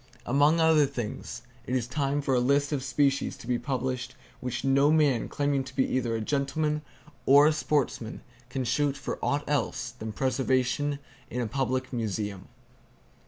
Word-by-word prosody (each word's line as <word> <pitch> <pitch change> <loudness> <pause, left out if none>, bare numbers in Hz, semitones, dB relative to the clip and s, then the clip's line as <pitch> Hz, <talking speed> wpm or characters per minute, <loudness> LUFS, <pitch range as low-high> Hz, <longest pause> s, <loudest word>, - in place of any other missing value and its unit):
Among 145 +6 +4
other 160 -3 +5
things, 120 0 -5 0.2
it 125 - -1
is 125 -3 0
time 140 +2 -1
for 135 - +1
a 125 - +4
list 140 +4 +2
of 140 -3 -1
species 140 0 +1
to - - -12
be 120 0 0
published 130 -2 -3 0.2
which 125 -2 -4
no 140 +2 +4
man 145 -7 +3
claiming 145 -1 0
to 130 0 -11
be 130 - +3
either 120 -3 -1
a 110 - -2
gentleman 150 +4 0 0.5
or 145 +2 +8
a 155 - +5
sportsman 140 -6 -1 0.3
can 130 +1 -2
shoot 140 +4 +1
for 135 - -5
aught 145 +1 0
else 130 -2 -1
than 110 -3 -6
preservation 130 +3 0 0.3
in 125 - -3
a 120 - 0
public 130 +2 -2
museum. 105 -4 -3
135 Hz, 165 wpm, -28 LUFS, 125-145 Hz, 0.5 s, or